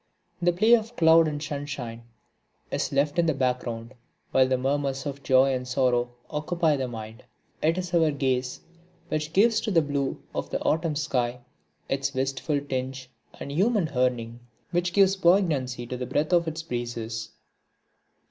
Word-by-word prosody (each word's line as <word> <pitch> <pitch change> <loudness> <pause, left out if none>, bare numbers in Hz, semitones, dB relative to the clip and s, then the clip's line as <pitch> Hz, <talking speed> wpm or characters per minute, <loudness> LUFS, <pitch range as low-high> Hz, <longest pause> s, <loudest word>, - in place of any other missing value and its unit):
The 175 0 +4
play 215 +7 +4
of 230 0 +2
cloud 165 -2 +6
and 150 -1 -3
sunshine 140 -6 -5 0.7
is - - -1
left 145 +3 +1
in 170 - +3
the 160 - +2
background, 125 -2 -2 0.4
while 130 -1 +4
the 130 0 +1
murmurs 135 +1 -1
of 140 -1 -5
joy 130 0 +4
and 125 -1 -3
sorrow 125 -1 +1 0.2
occupy 155 +1 0
the 135 -2 -2
mind. 110 0 -8 0.4
It 165 +3 +2
is 180 -1 -4
our 165 -2 +4
gaze 130 -3 -1 0.5
which 155 0 -2
gives 220 +5 +4
to 225 - -2
the 165 -6 +3
blue 140 -2 -2
of - - -3
the - - -2
autumn 160 -1 +1
sky 125 -5 -1 0.5
its 135 0 -1
wistful 135 +2 -1
tinge 130 -1 -4 0.3
and 140 - -6
human 190 +1 +1
yearning 120 -2 0 0.3
which 175 0 0
gives 195 +1 +4
poignancy 160 -10 +2
to 125 +1 -5
the 125 0 -4
breath 155 +4 0
of 170 -1 +3
its 160 +1 -4
breezes. 120 -4 -4
140 Hz, 160 wpm, -26 LUFS, 125-165 Hz, 0.7 s, cloud